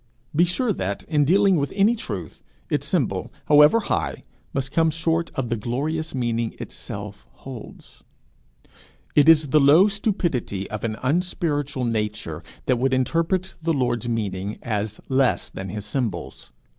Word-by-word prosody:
Be 170 +3 +5
sure 215 +6 0
that, 100 - -3
in 150 -3 +2
dealing 195 +3 +4
with 140 -1 -1
any 205 +4 +4
truth, 95 - -6 0.3
its - - 0
symbol, - - -1
however 150 +9 +6
high, 75 - -2 0.3
must 135 -1 -3
come 160 +1 +3
short 165 +1 0
of 130 -3 -2
the 120 - +1
glorious 145 +8 -2
meaning 115 -2 -1
itself 100 0 -7
holds. 130 -4 -11 1.1
It 150 +2 +6
is 155 -3 +6
the 150 - +5
low 150 +8 +7
stupidity 175 - -1
of 105 -1 -5
an 110 -2 -1
unspiritual 145 -3 0
nature 105 -8 -2 0.2
that 125 -2 +2
would 130 +1 +2
interpret 165 +8 0
the 165 0 +1
Lord's 120 -4 0
meaning 100 -3 -2
as 105 -2 -2
less 130 -1 +1
than 95 0 -7
his 105 +2 -5
symbols. 105 - -4
135 Hz, 145 wpm, -23 LUFS, 110-165 Hz, 1.1 s, low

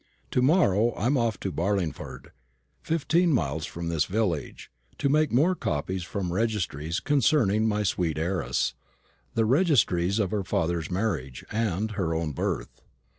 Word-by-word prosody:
To 125 - +2
morrow 120 - +3
I 105 - -3
am 135 +4 +3
off 115 -5 0
to 95 - -2
Barlingford, 80 -6 -3 0.5
fifteen 165 +2 +2
miles 80 - 0
from 85 0 -6
this 80 -2 +1
village, 95 -7 -2 0.3
to 140 - 0
take 150 +2 +3
more 155 +10 +4
copies 90 - -2
from 90 0 -3
registries 90 -7 -1
concerning 125 -7 +2
my 105 -1 0
sweet 90 -5 0
young 80 - 0
heiress 70 -9 0 0.6
the 115 - +3
registries 110 - +3
of 100 -5 0
her 105 -2 -1
father's 85 -3 -1
marriage, 90 - -2
and 110 -1 -1
her 90 -6 -1
own 80 -1 -1
birth. 70 - -3
100 Hz, 150 wpm, -27 LUFS, 85-115 Hz, 0.6 s, more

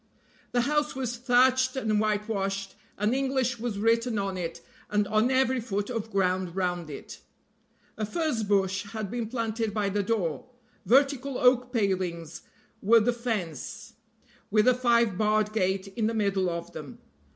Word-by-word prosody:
The 245 - +2
house 295 +3 0
was 250 -2 -2
thatched 255 +1 +3
and 220 -5 +1
whitewashed, 205 -2 -1 0.2
and 210 +4 +1
English 260 -3 0
was 230 -3 -3
written 230 +2 +1
on 195 -1 -2
it 170 -2 -4 0.3
and 210 -1 +1
on 215 +4 +2
every 260 -1 +2
foot 205 -1 -3
of 225 -2 -3
ground 185 -3 0
round 180 -3 -1
it. 145 - -9 0.8
A - - -1
furzebush 205 - 0
had 215 -3 -4
been 235 -2 -2
planted 225 -2 -2
by 205 -2 +1
the 205 +1 0
door. 200 -2 -2 0.4
Vertical 275 +2 +3
oak 250 0 +3
palings 185 - -1 0.4
were 230 +3 +6
the 240 +3 +1
fence, 215 - -4 0.6
with 215 +3 +3
a 255 - +7
five 235 -5 +2
barred 215 0 +2
gate 190 -1 0
in 215 +3 -1
the 225 - -1
middle 200 -3 +1
of 170 0 -5
them. 145 -3 -8
215 Hz, 150 wpm, -27 LUFS, 195-245 Hz, 0.8 s, a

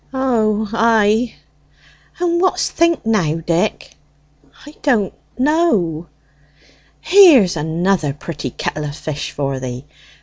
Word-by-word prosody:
"O, 220 -5 0
ay." 225 0 +2 0.8
"And 345 -1 0
what's 370 - 0
think 335 -6 +1
now, 190 -9 +1
Dick?" 170 +5 -2 0.7
"I 295 - -12
don't 230 -9 +1 0.2
know." 250 - +1 0.9
"Here's 315 - +6
another 160 +1 -1
pretty 145 -1 -6
kettle 150 +4 -4
o' 145 - -4
fish 150 -1 -5
for 135 -2 -3
thee. 125 +1 -7
210 Hz, 105 wpm, -18 LUFS, 160-260 Hz, 0.9 s, Here's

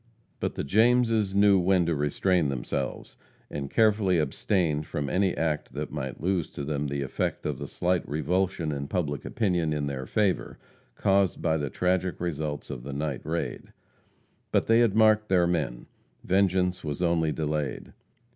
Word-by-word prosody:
But - - -2
the - - -2
Jameses 110 - +3
knew 100 -1 +5
when 90 -1 +3
to 85 - +1
restrain 75 +3 +1
themselves, 65 0 -4 0.3
and 70 -2 -4
carefully 105 -3 +3
abstained 75 0 0
from 70 -1 -3
any 95 -1 +1
act 80 -2 -1
that - - -4
might 65 -1 -5
lose 90 -1 0
to 70 - -5
them 75 0 -2
the 70 0 -2
effect 65 - -3
of - - -2
the - - -5
slight 90 -1 -1
revulsion 85 +2 0
in 70 -1 -4
public 75 -6 -2
opinion 90 -8 0
in 75 -1 -1
their 65 -2 -4
favor 105 -4 0 0.4
caused 95 -2 +2
by 80 -2 +1
the 75 -2 -2
tragic 90 +2 0
results 75 -4 -3
of 65 -4 -6
the 70 +2 -7
night 70 -1 -3
raid. 80 +2 -4 0.8
But - - +2
they 115 +1 +4
had 115 -4 +3
marked 110 -1 +4
their 90 -2 +4
men 75 -9 -1 0.4
vengeance 95 -1 +2
was 75 +2 -3
only 85 -2 +2
delayed. 75 -3 -3
85 Hz, 165 wpm, -27 LUFS, 75-95 Hz, 0.8 s, knew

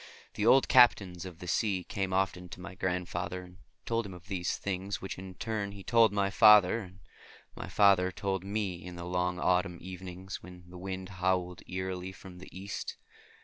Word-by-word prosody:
The - - 0
old 135 - +6
captains 100 -8 +5
of 90 -3 -10
the 90 - -9
sea 95 -1 +1
came 95 0 -3
often 95 -1 0
to - - -9
my 95 +1 -8
grandfather 90 -1 -3
and 90 0 -15 0.3
told 115 0 0
him 95 -4 -8
of 90 +3 -15
these 90 -3 -1
things 95 0 -3
which 95 - -6
in 95 -1 -9
turn 100 -1 -3
he 100 -1 -10
told 115 0 +5
to 100 - -8
my 100 -1 +1
father, 105 0 +7
and 95 -1 -12 0.6
my - - -6
father 95 -3 +4
told 95 -1 -2
to 95 - -10
me 100 -4 -2
in 90 -1 -8
the 85 0 -7
long 90 0 -1
autumn 90 0 +1
evenings 95 +1 -8
when 90 0 -12
the 90 0 -11
wind 95 0 -5
howled 90 -1 0
eerily 95 0 -4
from 90 0 -12
the 95 - -11
East. 95 +2 -6
95 Hz, 195 wpm, -31 LUFS, 90-100 Hz, 0.6 s, father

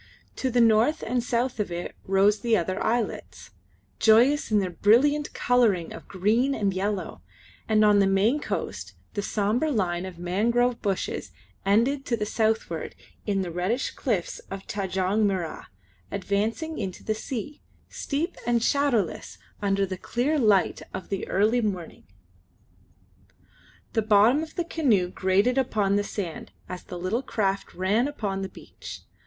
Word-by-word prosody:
To 260 - 0
the 245 0 +3
north 225 +6 +4
and 245 +1 0
south 245 0 -1
of 205 -4 -1
it 175 +1 -5
rose 195 +2 +3
other 190 -6 +1
islets, 100 - -2 0.5
joyous 240 +7 +4
in 215 - +3
their 190 -3 0
brilliant 270 - +3
colouring 225 -9 +2
of - - -11
green 225 +8 +1
and 200 -4 0
yellow, 190 - -3 0.5
and 215 -1 +4
on 205 -1 +5
the 195 - +4
main 200 +9 +3
coast - - -4 0.2
the 205 - -2
sombre 215 +9 0
line 185 -8 -1
of 180 -2 -9
mangrove 235 +8 +1
bushes 195 -3 -2 0.4
ended 245 +8 +3
to 235 - +1
the 210 - -2
southward 220 -7 -1 0.3
in 195 -2 +1
the 175 - -5
reddish 185 +9 -1
cliffs 210 -10 -2
of 195 0 -7
Tanjong 195 +1 0
Mirrah, 185 -5 -3 0.4
advancing 215 - -2
into 190 -4 -5
the 215 - 0
sea, 245 +5 -6 0.3
steep 315 +6 -3
and 235 -1 +2
shadowless 255 - 0 0.2
under 200 -1 +1
the 185 -1 -5
clear, 280 +9 0
light 210 -6 +3
of 190 - -7
the 195 - -3
early 215 +6 +2
morning. 190 -6 -4 1.9
The 225 - +2
bottom 215 +6 +4
of 320 0 -8
the 345 - -1
canoe 235 - +2
grated 200 +8 +2
upon 210 -6 +1
the 205 - +2
sand 190 -5 -5 0.2
as 180 -1 -6
the 180 - -7
little 185 +8 -1
craft 200 -6 -2
ran 205 +8 +1
upon 205 -9 -3
the 190 - -4
beach. - - -11
210 Hz, 150 wpm, -26 LUFS, 190-240 Hz, 1.9 s, on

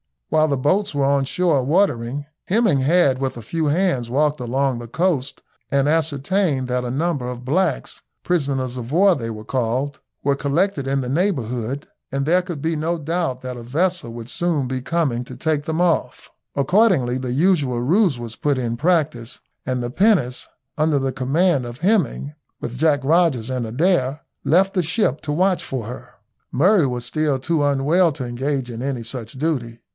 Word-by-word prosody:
While 155 0 +3
the 140 -2 0
boats 170 +6 +1
were 140 -1 +2
on 140 0 +2
shore 165 -2 +1
watering, 145 -4 +1 0.2
Hemming 205 - +2
had 140 -2 +3
with 135 -1 -2
a 120 - -7
few 160 +8 -2
hands 145 -6 +1
walked 150 +3 +1
along 130 +1 0
the 120 - -8
coast 145 -1 -1 0.3
and 140 0 +2
ascertained 155 -2 0
that 125 0 -1
a - - -3
number 140 -1 -1
of 125 0 -7
blacks, 160 +1 -1 0.2
prisoners 135 -7 -1
of 125 +2 -6
war 195 +3 +5
they 115 -7 -4
were 110 -1 -7
called, 130 +3 -1 0.2
were 140 0 +1
collected 145 +1 0
in 135 0 +1
the 125 - -4
neighbourhood, 135 - -1 0.3
and 135 0 0
there 175 +4 +3
could 175 -5 -6
be 160 +1 -1
no 165 +3 -1
doubt 160 -4 -2
that 125 -1 -6
a - - -7
vessel 160 +2 -1
would 115 0 -8
soon 160 -6 0
be 130 0 -3
coming 135 -5 -1
to 125 - -9
take 145 +2 -1
them 160 +1 -1
off. 175 -2 0 0.2
Accordingly 140 - +3
the 130 -1 -3
usual 145 -6 +2
ruse 170 - +3
was 115 -1 -7
put 145 -2 0
in 120 -2 -2
practice, 145 -7 0 0.3
and 125 -1 -1
the 120 - -3
pinnace, 170 - +2 0.3
under 155 -1 +2
the 135 -1 0
command 135 +3 +1
of 120 +4 -8
Hemming, 175 - +1 0.3
with 120 +1 -5
Jack 150 -1 +3
Rogers 145 -6 +2
and 125 -3 -2
Adair, 140 +1 +1 0.2
left 190 +4 +3
the 185 - +2
ship 165 - 0
to 150 - -4
watch 185 +3 +2
for 130 -5 -4
her. 125 +2 -9 0.4
Murray 170 +3 +4
was 125 -1 -3
still 150 +2 0
too 150 +3 0
unwell 145 +5 +3
to 135 -3 -5
engage 130 +1 -2
in 115 0 -6
any 130 -3 -2
such 115 -1 -6
duty. 130 -6 -2
140 Hz, 180 wpm, -21 LUFS, 125-165 Hz, 0.4 s, war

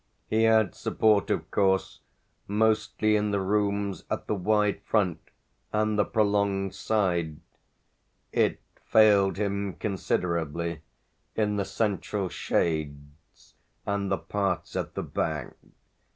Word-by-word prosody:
He 110 +1 +2
had 110 -3 +4
support 105 -2 +2
of - - -2
course 95 -2 +1 0.5
mostly 110 0 +2
in 105 0 +1
the 100 -1 0
rooms 100 -1 0
at - - -3
the - - -1
wide 105 +1 +1
front 95 -7 +1 0.5
and 110 0 +1
the 105 - +3
prolonged 100 -2 +1
side; 85 -8 0 0.9
it - - +1 0.2
failed 100 -3 +5
him 100 -1 -1
considerably 85 -5 -2 0.5
in 105 -1 0
the 100 - 0
central 100 -1 -1
shades 75 -3 -3 0.3
and 100 -1 -1
the 95 - +2
parts 100 -3 -2
at - - -3
the - - -2
back. 75 -4 -3
100 Hz, 115 wpm, -27 LUFS, 90-105 Hz, 0.9 s, failed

